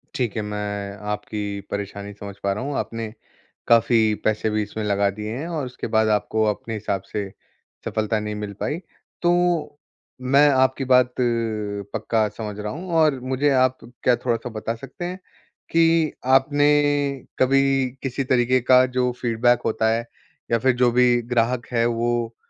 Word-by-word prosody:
ठीक 125 -7 -1
है, 110 - -1
मैं 105 -1 -4
आपकी 105 -1 -4
परेशानी 100 0 -5
समझ 100 0 -9
पा 100 - +1
रहा 105 - -4
हूँ, 140 +1 -3
आपने 115 -1 -4 0.5
काफ़ी 115 -1 +4
पैसे 110 0 +1
भी 105 0 0
इसमें 105 +1 -5
लगा 100 -1 +2
दिए 105 +2 -6
हैं 155 +5 -4
और 160 -5 -3
उसके 125 - -6
बाद 110 0 +4
आपको 110 +1 +1
अपने 115 +2 -8
हिसाब 100 -3 -2
से 100 -2 -3 0.6
सफलता 110 0 -1
नहीं 105 0 -4
मिल 105 -1 -5
पाई। 145 +4 -2 0.4
तो, 175 -4 +1 0.4
मैं 140 +3 +5
आपकी 130 0 +2
बात 125 -1 +5
अ, 115 -5 -2
पक्का 110 -2 0
समझ 105 -2 -5
रहा 105 0 -4
हूँ 175 +3 -7
और 150 -4 +3
मुझे 130 +3 0
आप 130 -1 +3 0.3
क्या 125 - +4
थोड़ा-सा 120 0 -1
बता 110 0 -4
सकते 135 +8 -8
हैं, 180 +2 -5 0.5
कि 165 -1 +3
आपने 145 +3 +4 0.7
कभी 135 +1 +4 0.4
किसी 135 0 -2
तरीक़े 125 0 +2
का 125 +1 +5
जो 125 0 +2
फ़ीडबैक 120 0 +2
होता 110 0 +1
है 115 +1 0 0.5
या 115 - +4
फिर 130 +2 +3
जो 125 -1 +3
भी 120 0 +4
ग्राहक 120 +1 +1
है 115 -1 +2
वो 120 0 -1
120 Hz, 165 wpm, -23 LUFS, 105-130 Hz, 0.7 s, मैं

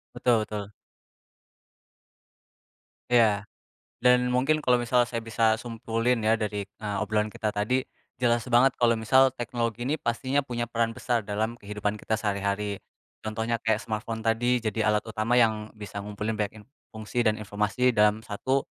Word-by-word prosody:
Betul 120 -3 +3
betul. 105 -1 -5 2.4
Ya. 110 -4 +4 0.6
Dan 125 0 +5
mungkin 135 +5 +2
kalau 125 -4 +3
misal 120 0 +2
saya 115 -2 -4
bisa 110 0 +2
simpulin 115 +1 -1
ya 110 +1 +3
dari, 105 -2 -3
eee, 105 -1 -5
obrolan 105 -1 0
kita 110 - -2
tadi, 120 +6 +1 0.4
jelas 120 -1 +2
banget 125 +2 +5
kalau 120 -1 +3
misal 130 +3 +5
teknologi 120 -2 -3
ini 150 - +1
pastinya 130 +2 -1
punya 120 -3 -3
peran 115 -1 0
besar 120 -1 -1
dalam 110 +3 -2
kehidupan 105 -1 -3
kita 110 +1 -2
sehari-hari, 100 0 -1 0.5
contohnya 110 +2 -1
kayak 110 -1 +2
smartphone 110 0 -4
tadi 120 +2 +1
jadi 110 -1 -1
alat 105 - +2
utama 110 +2 0
yang 110 -2 +1
bisa 105 -1 -8
ngumpulin 105 +1 -3
banyak 105 -1 -1
in - - -22 0.3
fungsi 110 +2 -2
dan 110 -1 +1
informasi 105 +4 0
dalam 105 +1 +4
1, 130 +6 -1
115 Hz, 150 wpm, -27 LUFS, 105-120 Hz, 2.4 s, Dan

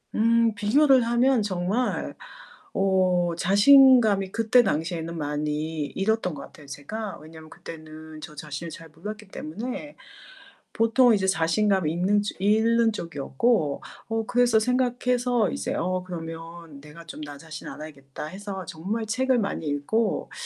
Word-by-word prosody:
음. 230 0 +3
비교를 260 +6 +4
하면 240 +1 +3
정말 195 +5 -2 0.6
어 185 -2 +2
자신감이 205 0 +5
그때 230 +2 +4
당시에는 165 -2 -2
많이 150 +1 -2
잃었던 200 -2 -1
것 140 - -8
같아요 150 -6 -15
제가. 195 +10 -6
왜냐하면 160 +1 -13
그때는 155 -1 -11
저 150 - -10
자신을 150 +2 -6
잘 165 0 -11
몰랐기 210 +5 -9
때문에 250 - -6 0.8
보통 230 +2 +4
이제 190 - -1
자신감 190 0 +1
있는 185 +6 +1 0.2
잃는 225 +3 +3
쪽이었고 165 - -1 0.3
어 225 0 -1
그래서 240 -2 +3
생각해서 245 -1 +1
이제 - - -3
'어 185 +1 -1
그러면 165 -3 -8
내가 150 +3 -13
좀 155 - -9
나 145 -1 -8
자신을 155 +1 -9
알아야겠다.' 140 -3 -9
해서 190 +2 -7
정말 200 +9 -4
책을 255 +3 +1
많이 200 -6 -3
읽고 150 +11 -1
190 Hz, 290 characters per minute, -25 LUFS, 160-225 Hz, 0.8 s, 자신감이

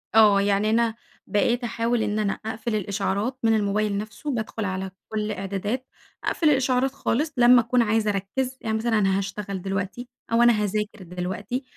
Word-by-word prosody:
آه 210 -3 +7
يعني 200 +1 +2
أنا 230 0 +2 0.3
بقيت 235 +4 +1
أحاول 235 0 0
إن 210 0 -1
أنا 205 -2 +1
أقفل 220 0 -3
الإشعارات 205 +4 -1
من 225 -1 +4
الموبايل 205 0 0
نفسه، 220 +8 -5
بادخل 220 -2 -3
على 190 0 -3 0.2
كل 215 -1 -1
إعدادات 205 +6 -3 0.4
أقفل 315 -3 +2
الإشعارات 260 -1 +2
خالص 295 +5 -1
لمّا 245 0 +7
أكون 240 +1 +2
عايزة 220 -1 +2
أركز، 250 +7 -2
يعني 220 -1 -1
مثلًا 225 0 +1
أنا 195 -1 +2
هاشتغل 195 -1 -4
دلوقتي، 195 +5 -3 0.2
أو 230 - +4
أنا 240 - +6
هاذاكر 210 0 -2
دلوقتي 185 +8 -4
215 Hz, 165 wpm, -25 LUFS, 200-240 Hz, 0.4 s, آه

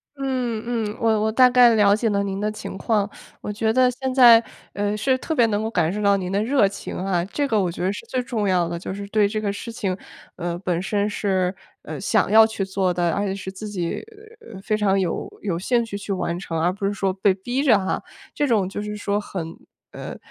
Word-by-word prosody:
嗯， 255 -5 -2 0.3
嗯， - - -15
我 220 -2 +2
我 220 +1 +1
大 255 +3 +6
概 245 -2 +6
了 205 -1 +5
解 225 +1 0
了 200 -1 +1
您 195 -1 -3
的 210 +1 0
情 215 - -7
况。 205 0 0 0.3
我 - - -4
觉 220 +1 0
得 255 +2 +4
现 260 +1 -3
在， 240 -3 +8 0.3
呃， 205 +1 -1
是 260 +5 +2
特 320 +5 -3
别 240 -5 +5
能 210 -1 0
够 220 - -1
感 175 -5 0
受 210 - -3
到 200 -1 +4
您 185 -1 -4
的 200 +1 +1
热 240 -3 +3
情 195 - -7
哈， 185 -3 0
这 285 +9 -2
个 220 -5 +2
我 180 -2 0
觉 175 - -5
得 190 +2 +1
是 - - -7
最 255 - -1
重 225 -4 -2
要 180 -3 +2
的。 170 0 -4
就 185 - -5
是 200 +1 -6
对 210 -1 +3
这 215 +1 -2
个 205 -2 -2
事 230 +3 -7
情， 195 -5 -2 0.4
呃， 175 -1 -3
本 175 -2 -1
身 200 +2 0
是， 190 -3 0 0.3
呃， - - -6
想 - - +1
要 220 +1 +8
去 220 -3 -3
做 190 -1 0
的， 175 -1 +1
而 200 +4 -1
且 190 - -2
是 190 -1 -6
自 205 +3 -8
己 180 -5 -3 0.6
非 215 - 0
常 200 -2 +2
有 180 -3 -2
有 180 -5 -1
兴 235 +5 +1
趣 225 - -7
去 200 0 -6
完 175 -3 -2
成， 165 -3 -4
而 175 +3 +1
不 200 +1 -4
是 200 - -1
说 195 -1 -1
被 195 +1 +2
逼 240 +8 -3
着 245 -8 +5
哈。 190 -1 -2 0.3
这 290 - 0
种 215 -7 +2
就 200 +2 -5
是 210 0 -5
说 205 0 -1
很 190 -5 -5 0.4
呃， - - -7
205 Hz, 260 characters per minute, -23 LUFS, 190-225 Hz, 0.6 s, 在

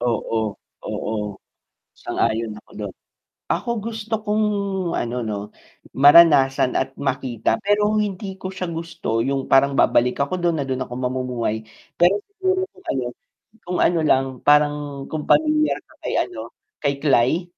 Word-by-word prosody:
Oo, 110 -3 -1 0.3
oo. 105 -2 -3 0.7
Sang-ayon 115 0 -1
ako - - -21
dun. 100 -3 -5 0.6
Ako 220 +5 -1
gusto 225 0 -7
kong 215 0 +1 0.5
ano 120 +1 -2
no, 105 -2 -3 0.6
maranasan 140 -3 +6
at 135 0 -2
makita, 130 -4 -1
pero 210 +1 +2
hindi 195 -2 -3
ko 190 0 -6
siya 185 -2 -4
gusto 165 -9 -3
yung 135 0 -2
parang 140 +1 +5
babalik 125 -1 +3
ako 140 +5 0
dun 170 -3 0
na 140 - -1
dun 130 0 -1
ako 125 - -13
mamumuhay, 125 -4 -2 0.3
pero 180 +4 +4
siguro 380 -1 -1
kung 380 - -18
ano 130 -2 -2 0.6
kung 180 0 -3
ano 170 -2 +3
lang, 135 -3 +4 0.2
parang 150 0 +5 0.4
kung 155 -1 -3
pamilyar 305 0 +3
ka - - -22
kay - - -2
ano 360 - -8 0.3
kay 140 -1 +1
Klay? 145 +5 +3
145 Hz, 145 wpm, -22 LUFS, 125-195 Hz, 0.7 s, maranasan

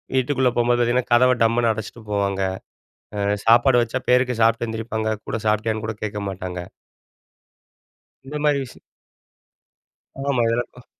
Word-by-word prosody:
வீட்டுக்குள்ள 130 0 +2
போகும்போது 120 0 +2
பார்த்தீங்கன்னா, 120 +1 0
கதவை 125 +1 +5
டம்முனு 115 0 +2
அடைச்சிட்டு 110 +1 -7
போவாங்க. 100 -1 0 0.8
ஆ - - -3 0.3
சாப்பாடு 120 +2 +5
வச்சா 120 +2 -2
பேருக்கு 125 -1 +2
சாப்பிட்டு 115 +1 +3
எந்திரிப்பாங்க 110 -1 -2
கூட 110 - -2
சாப்பிட்டியான்னு 110 +1 0
கூட 110 - -3
கேட்க 105 -1 -4
மாட்டாங்க. 90 -1 -5 1.6
இந்த 140 +3 -7
மாதிரி 145 -1 +3
விஷயம் 125 - -14 1.5
ஆமா. 130 -4 +2
இது 115 - +1
எல்லாருக்கும் 120 +1 -5
115 Hz, 130 wpm, -22 LUFS, 110-125 Hz, 1.6 s, கதவை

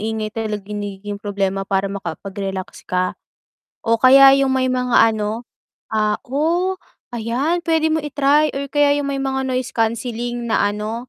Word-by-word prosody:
ingay 220 0 -3
talaga 215 -3 -4
nagiging 205 0 -5
problema 195 -2 -2
para 195 0 0
makapag-relax 195 +1 -6
ka? 180 0 0 0.7
O 230 0 +3
kaya 270 +1 +8
yung 275 - +2
may 260 0 +1
mga 250 -1 +1 0.2
ano 215 +2 -3 0.5
ah, 215 -1 +1
oh, 335 +8 0 0.4
ayan, 260 +10 -1
pwede 320 -1 +2
mo 315 - +1
i-try 295 +1 +2
o 280 +1 -4
kaya 290 0 +3
yung 280 - -3
may 275 - -2
mga 265 0 -1
noise 255 -1 -2
canceling 235 +1 -2
na - - +2
ano, 220 +4 -5
235 Hz, 150 wpm, -20 LUFS, 205-275 Hz, 0.7 s, kaya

